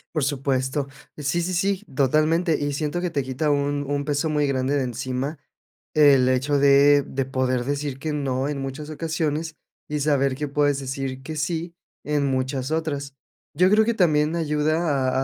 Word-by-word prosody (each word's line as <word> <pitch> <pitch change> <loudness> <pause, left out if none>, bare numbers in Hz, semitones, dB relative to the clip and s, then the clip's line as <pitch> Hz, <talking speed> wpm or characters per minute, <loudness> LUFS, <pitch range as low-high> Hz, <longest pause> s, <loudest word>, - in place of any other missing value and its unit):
Por 155 - +1
supuesto. 135 0 -1 0.3
Sí, 150 +4 -1
sí, 180 +2 -2
sí, 195 +3 0
totalmente, 155 +5 +2
y 145 0 -2
siento 150 +4 -2
que 180 - -1
te 140 -3 -1
quita 130 +4 -2
un 145 0 0
un 145 0 -2
peso 150 +1 0
muy 150 -1 +1
grande 135 +1 0
de 140 - 0
encima 130 +4 -3 0.6
el 140 -4 +5
hecho 135 +3 +1
de 140 +1 +6
de 135 0 -3
poder 130 -2 -1
decir 140 -1 -3
que 155 +1 -3
no 135 -2 -1
en 140 -2 -3
muchas 135 +3 -6
ocasiones, 160 0 -2 0.3
y 150 0 -1
saber 140 -2 +1
que 150 +1 -3
puedes 145 0 +1
decir 135 0 -4
que 155 +2 -6
sí 170 +2 -3 0.3
en 150 -1 0
muchas 130 +1 -2
otras. 145 -4 -2 0.4
Yo 180 +1 +4
creo 215 +2 +5
que 235 - +1
también 160 -4 +2
ayuda 150 -3 +1
145 Hz, 175 wpm, -23 LUFS, 135-155 Hz, 0.6 s, de